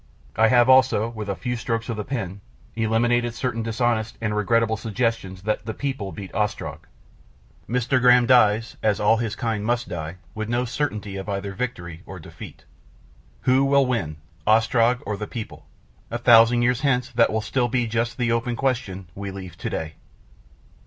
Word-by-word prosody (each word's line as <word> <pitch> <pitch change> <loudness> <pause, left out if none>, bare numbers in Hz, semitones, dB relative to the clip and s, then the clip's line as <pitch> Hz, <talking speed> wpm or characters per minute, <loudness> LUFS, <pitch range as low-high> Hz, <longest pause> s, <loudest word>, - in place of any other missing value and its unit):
I 110 - +5
have 120 +1 +5
also, 130 -4 +4
with 110 -3 -6
a 100 - -1
few 125 +3 -3
strokes 115 -1 -3
of 115 - -3
the 105 - -4
pen, 100 -6 -4 0.3
eliminated 115 +1 +1
certain 120 -2 -2
dishonest 115 -1 -1
and 105 -2 -2
regrettable 110 +2 +2
suggestions 110 -5 -2
that 105 +1 -2
the 110 - -3
People 135 -9 -3
beat 95 -1 -9
Ostrog. 105 +1 -3 0.8
My 125 - 0
Graham 125 -1 +5
dies, 115 -2 +3
as 105 -2 +1
all 110 +2 +4
his 115 -2 -2
kind 110 -3 -2
must 120 +2 -1
die, 80 0 -5 0.2
with 110 0 -4
no 120 +1 0
certainty 105 -7 -3
of 95 +2 -6
either 100 0 -3
victory 90 -8 -5
or 95 - -8
defeat. 80 - -11 0.8
Who 130 +1 +3
will 140 0 +4
win 115 -12 -2 0.3
Ostrog 115 +2 +3
or 105 0 -3
the 105 - -5
People? 110 -1 -8 0.4
A - - -2
thousand 120 +1 +6
years 125 +1 +1
hence 125 -3 +1
that 115 -1 +3
will 110 - 0
still 125 +2 0
be 120 0 0
just 115 +2 -2
the 120 -2 0
open 115 +1 0
question 115 -8 -2
we 100 +1 -6
leave 95 -3 -8
to - - -3
day. 80 -1 -4
115 Hz, 175 wpm, -23 LUFS, 105-120 Hz, 0.8 s, thousand